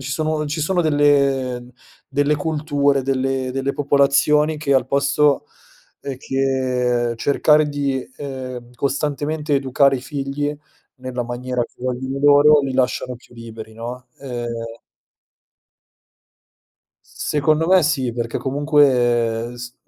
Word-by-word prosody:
ci 135 +1 -6
sono 155 0 -1
ci 150 +2 -3
sono 180 +4 +1
delle 140 -4 +2 0.5
delle 145 +2 +1
culture, 145 -2 0
delle 135 0 -1
delle 135 +1 -1
popolazioni 145 +2 +2
che 145 -2 0
al 130 -1 +2
posto, 140 +1 +2 0.5
ehm, 135 -2 -5
che 130 -3 0
cercare 150 +4 +3
di, 140 -2 -2
ehm, 130 -3 -7
costantemente 145 +3 -1
educare 135 0 +3
i - - -6
figli 145 +2 -3 0.4
nella 130 -1 -4
maniera 125 +1 -3
che - - -8
vogliono 130 +2 -3
loro, 145 +1 +6
li 135 - -2
lasciano 125 0 0
più 120 - -20
liberi, 115 -1 -10
no. 125 +3 -7
Ehm 120 -3 -6 2.3
Secondo 155 +2 0
me 185 0 +5
sì, 130 -5 0
perché 115 -1 -3
comunque 125 -5 +2
s 120 0 -8
135 Hz, 120 wpm, -20 LUFS, 125-145 Hz, 2.3 s, loro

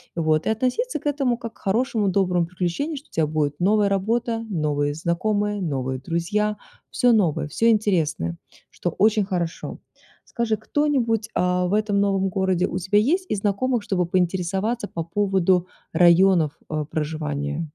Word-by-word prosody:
вот, 155 -2 +1
и - - +1
относиться 260 - -1
к - - -24
этому 275 -5 +1
как 230 -2 -7
к - - -25
хорошему, 220 0 0
доброму 180 -3 +1
приключению, 180 - -2
что 285 - -11
у - - -40
тебя 160 -2 +1
будет 150 -1 -1
новая 205 +2 +3
работа, 225 +4 0
новые 145 -4 0
знакомые, 205 +5 -1
новые 130 -5 -2
друзья, 205 +8 -1 0.3
всё 245 -1 +3
новое, 175 -9 +1
всё 230 +10 +2
интересное, 165 - +1 0.3
что 175 - -3
очень 210 +4 +3
хорошо. 175 -4 -3 0.5
Скажи, 230 -2 -1
кто-нибудь, 240 -7 0
а, 180 0 +1
в 185 - -2
этом 210 -1 +1
новом 195 -1 +1
городе 185 -1 +1
у - - -4
тебя 190 +3 +1
есть 355 - +1
из 210 - 0
знакомых, 210 +4 0
чтобы 180 -3 0
поинтересоваться 190 +5 -1
по 165 - -4
поводу 185 0 +1 0.3
районов, 175 -2 +5 0.2
э, 155 -1 -2
проживания? 150 0 -3
190 Hz, 155 wpm, -23 LUFS, 170-220 Hz, 0.5 s, районов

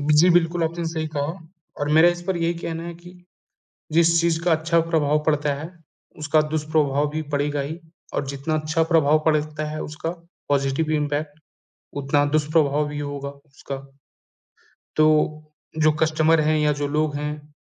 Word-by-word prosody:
जी, 150 +4 +5
बिल्कुल, 170 -1 +2
आपने 170 +1 -3
सही 160 -1 -2
कहा। 145 +6 -2 0.4
और 145 - -1
मेरा 160 +3 +7
इस 175 0 -2
पर 185 0 -2
यही 170 0 0
कहना 165 -1 -5
है 170 0 -6
कि 175 +1 -14 0.7
जिस 165 +1 +4
चीज़ 170 -1 +1
का 175 - +2
अच्छा 160 +1 +2
प्रभाव 150 -2 +2
पड़ता 150 -2 +1
है, 155 +5 -7 0.5
उसका 155 +1 +3
दुष्प्रभाव 150 -2 0
भी 155 +1 -3
पड़ेगा 145 0 0
ही 155 +4 -5 0.3
और - - -1
जितना 140 +3 -2
अच्छा 155 +1 0
प्रभाव 155 -2 +4
पड़ता 155 -1 0
है 155 0 -5
उसका 155 +2 -5 0.4
पॉज़िटिव 140 +2 +1
इंपैक्ट, 150 0 -2 0.5
उतना 145 +1 +1
दुष्प्रभाव 150 0 +1
भी 145 0 -5
होगा 145 -1 -4
उसका। 140 -1 -9 1.2
तो 155 0 +2 0.2
जो 155 0 +4
कस्टमर 160 0 +3
हैं 155 +1 +2
या 150 0 +3
जो 145 0 -2
लोग 150 0 0
हैं, 150 0 -5
155 Hz, 160 wpm, -23 LUFS, 145-160 Hz, 1.2 s, मेरा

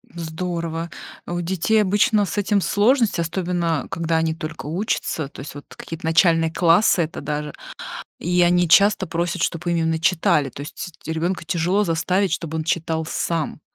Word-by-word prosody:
Здорово! 170 0 -4 0.4
У 175 0 -2
детей 190 +5 +1
обычно 205 +2 +3
с 190 +3 -5
этим 205 0 +2
сложность, 220 +1 +2
особенно 170 -2 -1
когда 165 -1 -1
они 160 0 +1
только 160 -1 -7
учатся, 160 -3 -2
то - - -13
есть 140 - -8
вот 145 - -9
какие-то 165 0 -8
начальные 165 0 +3
классы 170 +1 +4
это 160 +2 -6
даже. 150 0 -3 0.7
И 180 +1 +1
они 175 0 +4
часто 200 +2 +5
просят, 170 +1 -2
чтоб 170 +1 -1
им 170 - +1
именно 160 -1 0
читали, 155 -5 +2
то 140 - -9
есть 155 +4 -7 0.2
ребенка 170 +3 -2
тяжело 175 +5 +1
заставить, 185 +2 +1
чтоб 165 -1 -4
он 160 -1 -1
читал 160 0 -1
сам. 160 -1 -2
170 Hz, 160 wpm, -22 LUFS, 160-180 Hz, 0.7 s, часто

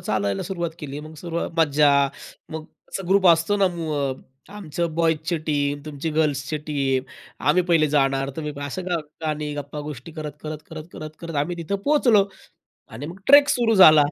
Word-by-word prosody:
चालायला 100 -2 -1
सुरुवात 175 -4 -3
केली. 145 -3 -6
मग 155 +1 -10
सुरुवात 170 +1 -3
मज्जा 150 -2 +4 0.6
मग 160 0 -5 0.3
असा 195 - -4
ग्रुप 195 0 +4
असतो 170 +4 +4
ना 200 -1 +4
मु 165 -2 -3
अ, 140 -2 0 0.4
आमची 175 -5 -3
बॉयज 165 -1 +2
ची 175 - +1
टीम, 145 -1 0
तुमची 155 +1 -4
गर्ल्स 150 -4 +2
ची 155 - -1
टीम. 135 -3 0 0.5
आम्ही 180 +5 +4
पहिले 165 -3 +4
जाणार, 135 -1 +1
तुम्ही 150 -2 -4
असं. 165 +6 -5
गा 180 -1 +1 0.3
गाणी 150 -1 -2
गप्पा 145 +1 -6
गोष्टी 150 +1 -8
करत, 155 -1 -6
करत, 155 0 -5
करत, 160 -1 -7
करत, 155 - -7
करत 170 -2 -7
आम्ही 175 +4 -4
तिथं 170 +4 -2
पोहोचलो 245 -9 +4 0.7
आणि 115 +6 -6
मग 175 +5 -9
ट्रेक 285 +1 +8
सुरू 230 -2 +2
झाला. 155 -4 +9
155 Hz, 185 wpm, -23 LUFS, 145-170 Hz, 0.7 s, झाला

